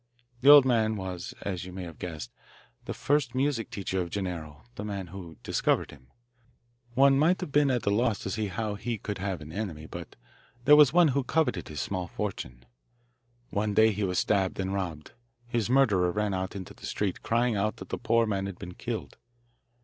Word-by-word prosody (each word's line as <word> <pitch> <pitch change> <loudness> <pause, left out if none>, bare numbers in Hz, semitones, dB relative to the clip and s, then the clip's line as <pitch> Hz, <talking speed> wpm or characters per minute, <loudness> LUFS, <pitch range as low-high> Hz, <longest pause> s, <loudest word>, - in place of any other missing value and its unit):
The 135 +3 +5
old 145 -2 +10
man 110 -4 +2
was, 95 -3 -5
as 95 -3 -3
you 90 - -8
may 90 0 -6
have 85 -2 -9
guessed, 75 -9 -6 0.5
the - - -3
first 140 -3 +1
music 130 -4 0
teacher 95 -1 -2
of 85 - -4
Gennaro, 80 -7 -5
the 100 - -6
man 100 -3 -4
who 85 -3 -9
discovered - - +1
him. 65 -2 -16 0.9
One 135 +1 +5
might 170 +5 +3
have 180 - -4
been 145 -1 +4
at 125 -4 0
a 100 - +3
loss 115 0 +2
to 95 - -3
see 105 +1 -1
how 105 +2 -3
he 115 +3 -3
could 105 -1 -5
have 95 -3 -3
an 75 +1 -9
enemy, 85 -5 -4
but 85 +1 -9 0.5
there 150 - +9
was 150 -3 +7
one 175 -2 +5
who 140 0 +1
coveted 130 - 0
his 75 -4 -4
small 90 +2 -3
fortune. 65 - -5 0.9
One 105 0 -1
day 110 +1 +6
he 105 0 -2
was 90 -2 0
stabbed 95 -2 +1
and 95 0 -1
robbed. 85 -6 -4 0.3
His 120 -2 -1
murderer 105 -10 +4
ran 105 +1 -1
out 95 +1 -3
into 95 -3 -7
the - - -9
street, 100 -3 -2
crying 115 0 +1
out 105 +2 0
that - - -10
the - - -3
poor 115 0 +3
man 100 -2 -1
had 95 -3 -7
been 90 -2 -8
killed. - - -5
100 Hz, 205 wpm, -28 LUFS, 90-120 Hz, 0.9 s, old